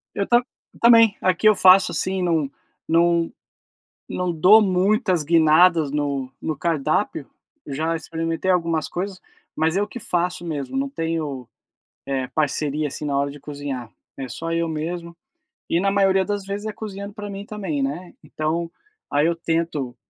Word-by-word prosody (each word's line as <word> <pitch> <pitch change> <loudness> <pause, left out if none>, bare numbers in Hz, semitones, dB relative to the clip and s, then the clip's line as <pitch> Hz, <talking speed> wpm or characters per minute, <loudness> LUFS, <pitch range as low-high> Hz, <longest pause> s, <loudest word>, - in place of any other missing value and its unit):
Eu 200 - -1
tam 240 0 +5 0.3
eu - - -19
também, 230 -3 +6
aqui 185 +3 +2
eu 210 - +4
faço 185 +1 +6
assim, 190 0 -1
não 165 -5 +1 0.4
não 170 0 +2 0.8
não 180 -1 -2
dou 185 +7 +7
muitas 190 -1 +2
guinadas 160 0 +4
no 140 -3 -2
no 155 -2 -3
cardápio, 160 -4 -1 0.4
eu 140 - -6
já 160 +3 -1
experimentei 165 +3 -2
algumas 165 -3 +1
coisas, 185 +1 -5 0.3
mas 160 +2 0
eu 205 +1 +1
que 245 - -8
faço 180 -1 -1
mesmo, 155 - -4
não 275 +1 0
tenho, 160 - -3 0.6
eh, 135 -2 -1
parceria, 150 0 -1
assim, 150 - -7
na 140 -2 -1
hora 140 0 0
de 145 - -11
cozinhar, 140 -5 -6 0.3
é 135 -1 -6
só 165 +7 -5
eu 165 0 0
mesmo 170 +2 -4 0.6
e, 170 - +2
na 195 0 +2
maioria 195 -1 +3
das 205 0 -3
vezes, 200 +2 -5
é 215 - -2
cozinhando 200 -1 -7
pra 210 -1 -7
mim 200 +1 -7
também, 195 -10 -3
né, 165 +6 -4
então, 160 +3 -3 0.4
aí 145 +1 +3
eu 170 - +1
tento, 165 -6 -2
170 Hz, 165 wpm, -22 LUFS, 150-190 Hz, 0.8 s, dou